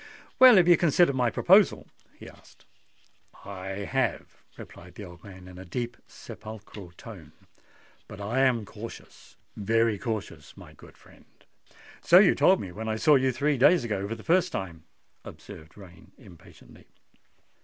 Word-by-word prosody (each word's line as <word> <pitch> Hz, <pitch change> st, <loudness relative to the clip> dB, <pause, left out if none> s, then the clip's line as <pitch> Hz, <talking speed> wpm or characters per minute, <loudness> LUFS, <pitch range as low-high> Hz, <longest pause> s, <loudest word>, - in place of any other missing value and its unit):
"Well, 255 Hz, -3 st, +8 dB
have 180 Hz, -3 st, +4 dB
you 175 Hz, -2 st, +6 dB
considered 170 Hz, -2 st, +2 dB
my 125 Hz, -2 st, +1 dB
proposal?" -, -, +3 dB, 0.3 s
he -, -, -13 dB
asked. -, -, -19 dB, 0.8 s
"I 95 Hz, 0 st, -7 dB
have," 130 Hz, -2 st, -3 dB, 0.2 s
replied 90 Hz, 0 st, -13 dB
the 105 Hz, -, -9 dB
old 85 Hz, -1 st, -15 dB
man 95 Hz, -2 st, -13 dB
in 90 Hz, 0 st, -13 dB
a -, -, -9 dB
deep 120 Hz, +7 st, -5 dB
sepulchral 105 Hz, -4 st, -12 dB
tone; -, -, -13 dB, 0.7 s
"but 105 Hz, -, -12 dB
I 105 Hz, +6 st, -3 dB
am 125 Hz, -5 st, +1 dB
cautious—very 115 Hz, 0 st, -5 dB
cautious, 100 Hz, -10 st, -7 dB
my -, -, -14 dB
good -, -, -18 dB
friend." -, -, -21 dB, 0.8 s
"So 175 Hz, -, +5 dB
you 190 Hz, -1 st, +6 dB
told 190 Hz, 0 st, +3 dB
me 95 Hz, -, -7 dB
when 110 Hz, +4 st, -7 dB
I 110 Hz, -, -2 dB
saw 150 Hz, +7 st, +3 dB
you 130 Hz, -2 st, +2 dB
three 140 Hz, +2 st, -1 dB
days 170 Hz, +5 st, +4 dB
ago 105 Hz, -4 st, -4 dB
for 115 Hz, -, -5 dB
the 110 Hz, -, -14 dB
first 180 Hz, +1 st, +1 dB
time," 85 Hz, -, -7 dB, 0.4 s
observed 80 Hz, +3 st, -13 dB
Rain 90 Hz, -4 st, -16 dB
impatiently. 85 Hz, -, -18 dB
110 Hz, 155 wpm, -26 LUFS, 95-135 Hz, 0.8 s, Well